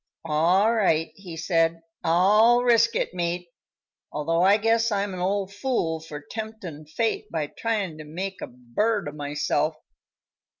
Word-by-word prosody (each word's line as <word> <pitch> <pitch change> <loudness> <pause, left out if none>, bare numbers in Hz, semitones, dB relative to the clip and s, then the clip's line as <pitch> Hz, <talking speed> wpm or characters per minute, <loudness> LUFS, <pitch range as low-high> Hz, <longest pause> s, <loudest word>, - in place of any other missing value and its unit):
"All 175 +8 +3
right," 165 -8 +2
he 180 -5 -10
said; 165 0 +1 0.2
"I'll 210 +8 +5
risk 230 -1 +4
it, - - -1
mate, 175 0 -2 0.6
although 165 +3 0
I 195 +3 +6
guess 225 +1 +2
I'm 200 -1 -1
an 180 - -5
old 195 +1 -1
fool 200 -8 -1
for 155 -2 -8
temptin' 180 -3 -7
fate 215 +5 -1
by 160 -3 -1
tryin' 200 -2 -3
to - - -7
make 185 +6 -5
a - - -4
bird 145 - -1
o' - - -4
myself. 150 +1 -1
180 Hz, 145 wpm, -25 LUFS, 160-215 Hz, 0.6 s, I